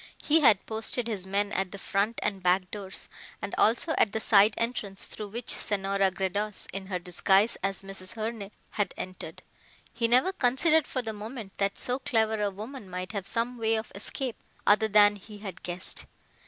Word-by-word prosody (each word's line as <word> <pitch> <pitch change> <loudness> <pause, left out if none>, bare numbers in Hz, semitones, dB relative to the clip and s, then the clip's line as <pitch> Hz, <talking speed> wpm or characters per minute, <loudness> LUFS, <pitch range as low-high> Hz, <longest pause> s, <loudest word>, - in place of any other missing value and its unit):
He 315 +2 +5
had 220 -10 +5
posted 225 +2 0
his 200 -5 -2
men 200 +1 0
at 190 -2 -1
the 200 - -6
front 200 +4 0
and 200 -2 -1
back 180 +1 +2
doors 195 -2 -5 0.3
and 200 - -5
also 240 +9 +3
at 210 - +3
the 220 - 0
side 210 -1 +5
entrance 220 -5 -2
through 210 - -6
which 235 +4 -2
Senora 195 -1 +1
Gredos 195 +3 -2
in 195 0 -5
her 190 -2 -1
disguise 190 +4 +2
as 195 +1 -2
Mrs. 195 0 -5
Herne 220 -2 -4 0.2
had 205 -3 -1
entered. 185 0 -7 0.5
He 230 - +1
never 255 +11 +4
considered 305 +2 +3
for 255 - -3
the 220 -1 -3
moment 215 -1 -7
that 200 0 +1
so 250 +1 -1
clever 220 -4 +1
a 205 - +2
woman 215 +2 -8
might 185 +1 -4
have 200 -3 -3
some 235 +1 -1
way 225 0 +2
of 220 0 -4
escape 235 +5 -4 0.3
other 215 +2 +5
than 205 0 +6
he 210 +2 -12
had 195 -4 -8
guessed. 180 +1 -2
205 Hz, 185 wpm, -28 LUFS, 195-230 Hz, 0.5 s, than